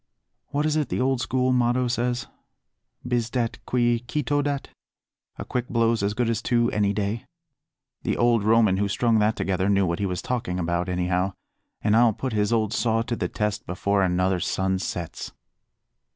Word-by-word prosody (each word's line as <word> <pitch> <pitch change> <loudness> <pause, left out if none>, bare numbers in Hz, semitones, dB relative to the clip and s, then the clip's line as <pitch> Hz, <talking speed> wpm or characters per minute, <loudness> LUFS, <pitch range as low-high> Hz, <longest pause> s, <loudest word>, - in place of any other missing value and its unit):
What 145 +1 -1
is 155 0 +1
it 150 - 0
the - - -1
old 130 0 +1
school 130 0 +1
motto 125 0 +2
says? 120 +1 -1 0.8
'bis 120 -2 0
dat 120 -1 -2
qui 120 -1 +2
cito 145 +2 0
dat,' 140 -1 -2 0.7
'a - - -6
quick 125 -1 -3
blow's 115 -1 +2
as 100 +1 -1
good 120 0 +1
as 115 -1 0
two 120 0 +1
any 100 -1 +1
day.' 105 +2 -2 0.7
The - - -1
old 120 -2 +3
Roman 110 -3 +4
who 100 +1 +1
strung 110 +3 +2
that 105 +1 +2
together 95 0 0
knew 100 -1 +3
what 85 -1 -1
he 100 - 0
was 90 -1 -3
talking 115 -8 -2
about, 85 +1 -1
anyhow, 90 +1 0 0.5
and 105 - +3
I'll 115 -1 +5
put 130 +3 -4
his 105 0 +1
old 110 -2 +1
saw 115 -2 +1
to 120 0 -3
the - - -2
test 105 0 -3
before 100 +2 0
another 90 0 +1
sun 95 +1 0
sets." 90 -3 -5
115 Hz, 180 wpm, -25 LUFS, 100-120 Hz, 0.8 s, I'll